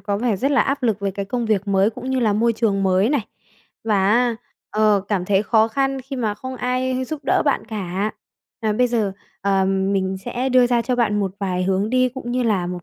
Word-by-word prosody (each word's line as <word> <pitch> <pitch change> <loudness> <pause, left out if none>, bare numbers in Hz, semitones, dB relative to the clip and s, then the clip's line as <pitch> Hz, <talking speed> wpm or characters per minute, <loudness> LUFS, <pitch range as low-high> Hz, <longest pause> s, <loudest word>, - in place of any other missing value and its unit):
có 200 -1 -2
vẻ 230 -4 0
rất 275 +8 0
là 280 - +4
áp 275 0 0
lực 220 -4 +1
về 200 -1 -1
cái 195 +1 -4
công 240 +2 -2
việc 205 -2 0
mới 195 +2 +3
cũng 255 +4 -6
như 260 - +1
là 220 -3 +2
môi 230 +3 +2
trường 210 -3 0
mới 190 +3 +3
này, 290 - +2 0.6
và 200 -3 +2
á, 240 0 +2 0.3
ờ, 215 -1 +3
cảm 190 -4 0
thấy 195 +1 +2
khó 220 0 +3
khăn 270 +2 -1
khi 265 +1 -7
mà 215 -4 -1
không 260 +4 -7
ai 255 +2 -1
giúp 310 +1 -5
đỡ - - +2
bạn - - +1
cả. 200 0 -2 0.5
À, 215 -1 0
bây 250 +4 +2
giờ, 220 -5 0 0.3
ờ, 195 -1 +2
mình 190 0 0
sẽ 255 +2 -2
đưa 255 -1 +5
ra 240 -1 +2
cho 250 +1 -1
bạn 210 -3 +1
một 195 -2 -1
vài 185 -2 -1
hướng 195 +3 0
đi, 255 0 +3
cũng 250 -1 -7
như 250 0 0
là 200 -6 +1
một 180 0 -5
215 Hz, 240 wpm, -21 LUFS, 195-250 Hz, 0.6 s, đưa